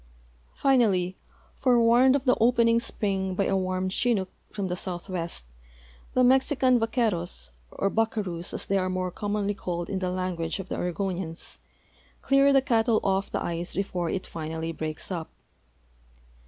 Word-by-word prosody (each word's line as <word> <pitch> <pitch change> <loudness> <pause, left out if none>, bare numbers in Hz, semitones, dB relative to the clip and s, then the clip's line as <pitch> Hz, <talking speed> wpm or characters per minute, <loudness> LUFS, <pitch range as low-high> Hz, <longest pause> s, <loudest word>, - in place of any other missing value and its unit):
Finally, 200 -9 +2 0.4
forewarned 245 +1 +4
of 280 -1 -1
the 250 - +5
opening 230 -1 +4
spring 195 -5 -1
by 195 - +1
a 195 - +1
warm 185 0 -1
chinook 195 -1 0 0.2
from 200 -2 -3
the 180 - -2
southwest, 175 - -4 0.7
the 255 - +5
Mexican 260 0 +4
vaqueros, 205 - -1 0.2
or 195 - 0
buccaroos, 200 -5 -1
as - - -5
the}' 195 0 +1
are 185 0 -1
more 185 0 -2
commonly 205 +1 -1
called 175 -4 -4
in 195 - -1
the 185 -1 -1
language 180 -3 -2
of 190 -1 -7
the - - -2
Oregonians, 180 -2 -3 0.6
clear 275 +1 +5
the 270 -1 +4
cattle 230 -2 +3
off 195 0 0
the - - -1
ice 170 +1 -3
before 180 -3 -1
it 185 - -2
finally 160 0 -4
breaks 155 +2 -5
U[). 165 -3 -3
190 Hz, 150 wpm, -27 LUFS, 180-230 Hz, 0.7 s, the